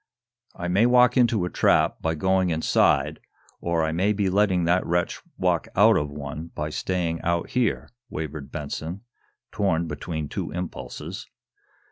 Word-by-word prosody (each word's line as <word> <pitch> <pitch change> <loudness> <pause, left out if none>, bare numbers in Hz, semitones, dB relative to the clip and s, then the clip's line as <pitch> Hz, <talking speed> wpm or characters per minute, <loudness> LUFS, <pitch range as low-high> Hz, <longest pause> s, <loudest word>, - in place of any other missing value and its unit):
"I 90 - -4
may 100 +7 +4
walk 125 0 +5
into 120 -7 +3
a - - -3
trap, - - +2
by 80 0 0
going 95 +2 +2
inside, 75 -2 +2 0.4
or 85 -1 0
I 80 - 0
may 95 +6 +1
be 100 -2 0
letting 95 -2 +2
that 90 +2 +2
wretch 85 +1 -1 0.2
walk - - +1
out 110 +4 +6
of 75 -5 0
one 75 +3 -6
by 75 +1 -3
staying 85 -1 -2
out 85 0 -1
here," 125 -4 0 0.2
wavered 75 - -6
Benson, 80 +5 -5 0.5
torn 85 -5 0
between 80 0 -4
two - - -4
impulses. 90 0 -6
85 Hz, 150 wpm, -25 LUFS, 80-95 Hz, 0.5 s, out